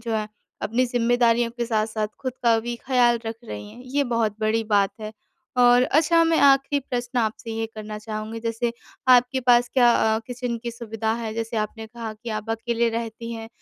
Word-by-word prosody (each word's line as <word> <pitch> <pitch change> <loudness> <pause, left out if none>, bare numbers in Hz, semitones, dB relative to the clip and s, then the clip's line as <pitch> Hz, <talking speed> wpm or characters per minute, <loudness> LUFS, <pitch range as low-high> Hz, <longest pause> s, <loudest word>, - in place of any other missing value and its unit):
जो 230 -1 -4
है। 215 -1 -2 0.3
अपनी 245 +4 +1
ज़िम्मेदारियों 240 -1 +2
के 235 0 -4
साथ-साथ 215 -1 0 0.2
ख़ुद 255 -1 -2
का 230 -1 +4
भी 240 +1 -4
ख़्याल 240 -2 +2
रख 225 0 -4
रही 105 - -7
हैं - - -13
ये 280 +3 -1
बहुत 230 -4 0
बड़ी 220 +1 +1
बात 200 -1 +4
है। 215 0 -6 0.5
और 245 0 +6
अच्छा 325 +4 +3
मैं 330 -1 +2
आख़िरी 275 +1 +4
प्रश्न 245 0 -2
आपसे 225 0 -2
ये 225 0 -2
करना 215 0 -6
चाहूँगी 215 +1 -6
जैसे 230 +1 -2 0.4
आपके 250 +1 +5
पास 245 -1 +4
क्या 245 -2 +6 0.3
अ, - - 0
किचन 245 -1 -4
की 235 - -3
सुविधा 225 -1 -3
है 220 -1 -3
जैसे 225 0 -3
आपने 220 +1 -3
कहा 225 -1 -7
कि 230 +2 -8
आप 215 +1 -4
अकेले 235 +1 0
रहती 230 0 -5
हैं 225 0 -7
230 Hz, 195 wpm, -24 LUFS, 220-245 Hz, 0.5 s, और